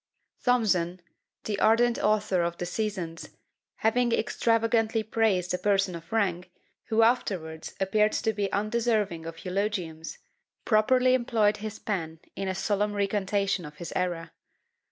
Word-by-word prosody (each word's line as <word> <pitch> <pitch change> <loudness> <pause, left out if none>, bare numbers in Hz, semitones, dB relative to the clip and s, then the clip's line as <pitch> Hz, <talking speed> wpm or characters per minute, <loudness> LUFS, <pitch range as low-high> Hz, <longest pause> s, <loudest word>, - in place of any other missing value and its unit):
Thomson, 190 -8 +2 0.4
the 205 -2 -3
ardent 235 +2 +3
author 205 -3 +2
of 170 0 -2
the 175 - -3
Seasons, 180 -4 -4 0.4
having 240 +2 +1
extravagantly 225 -1 +1
praised 210 -5 +1
a 180 - -1
person 195 -2 +1
of 170 +4 -9
rank, 185 -5 0 0.4
who 225 -1 +3
afterwards 180 -9 -1
appeared 210 +3 +2
to 220 -1 0
be 200 -1 -2
undeserving 215 -5 0
of 165 +2 -9
eulogiums, 180 -4 -3 0.5
properly 250 +4 +4
employed 230 -4 +2
his 215 0 -6
pen 165 -6 -3 0.2
in 195 - -3
a 190 - -1
solemn 205 +2 0
recantation 200 -1 0
of 150 -1 -9
his 170 +3 -7
error. 175 -2 -2
205 Hz, 135 wpm, -27 LUFS, 180-220 Hz, 0.5 s, properly